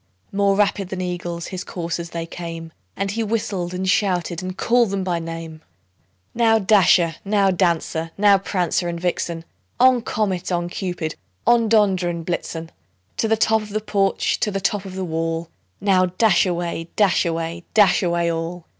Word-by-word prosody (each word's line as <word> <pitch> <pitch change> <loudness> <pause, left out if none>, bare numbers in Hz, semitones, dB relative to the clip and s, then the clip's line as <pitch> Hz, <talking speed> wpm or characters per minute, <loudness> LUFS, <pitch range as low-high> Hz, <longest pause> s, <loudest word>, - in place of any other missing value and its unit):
More 200 0 +2
rapid 200 -2 +1
than 190 - -4
eagles 175 -2 -4
his 185 -1 -5
coursers 170 -1 -4
they 165 0 -4
came, 165 -1 -7 0.2
And 195 0 -1
he 225 +3 -2
whistled, 205 -5 -2
and 185 +1 -3
shouted, 180 -3 +1
and 185 0 -6
called 235 -2 +3
them 195 -1 -2
by 175 -2 -1
name; 165 -1 -7 0.7
"Now, 225 -1 +4
Dasher! 185 -5 +4
now, 200 -1 +2
Dancer! 170 -2 0
now, 200 -1 +5
Prancer 180 -2 -1
and 170 0 -4
Vixen! 170 -1 -2 0.3
On! 255 -1 +5
Comet, 190 -6 -2
on! 175 -1 -1
Cupid, 175 -4 -4 0.3
on! 230 -2 +4
Dunder 195 -5 +3
and 170 -1 -4
Blitzen 165 -1 -4 0.5
To 225 - +1
the 225 0 +2
top 220 0 +3
of 210 - -9
the 215 +1 -1
porch, 200 -2 0
to - - +1
the 195 -1 -2
top 200 +1 -1
of 190 -1 -8
the 190 -1 -3
wall! 165 0 -2 0.3
Now, 185 -2 +3
dash 190 +1 +3
away, 170 -1 -3
dash 200 -4 +3
away, 165 0 -3
dash 210 0 +5
away 170 -2 +1
all!" 165 +1 -4
180 Hz, 170 wpm, -21 LUFS, 170-200 Hz, 0.7 s, now